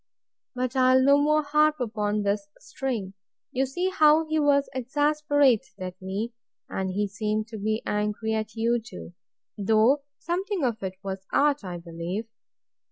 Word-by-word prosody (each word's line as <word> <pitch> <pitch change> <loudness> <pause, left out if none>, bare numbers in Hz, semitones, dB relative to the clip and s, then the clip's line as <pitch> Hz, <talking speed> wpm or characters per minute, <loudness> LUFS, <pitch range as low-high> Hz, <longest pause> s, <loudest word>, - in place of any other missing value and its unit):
But 255 +1 -2
I'll 255 0 +5
no 280 +2 +5
more 305 +1 +3
harp 300 +1 +3
upon 210 -3 -1
this 200 0 -1
string: 230 -8 -4 0.4
You 265 +1 0
see 355 +8 -1
how 310 -2 +5
he 315 0 +1
was 285 -1 +3
exasperated 290 -3 +1
at 185 0 -7
me; 200 +5 -3 0.3
and 190 0 -3
he 205 +2 -1
seemed 215 +2 -2
to 225 - -7
be 215 +2 -1
angry 210 +1 -1
at 220 0 -3
you 235 +1 +1
too; 225 -6 -10 0.5
though 220 +7 +4 0.2
something 365 +1 -2
of 235 -4 -1
it 190 -1 -4
was 195 0 -5
art, 290 -3 +2
I 180 -2 -5
believe. 170 +5 -5
235 Hz, 155 wpm, -26 LUFS, 205-285 Hz, 0.5 s, I'll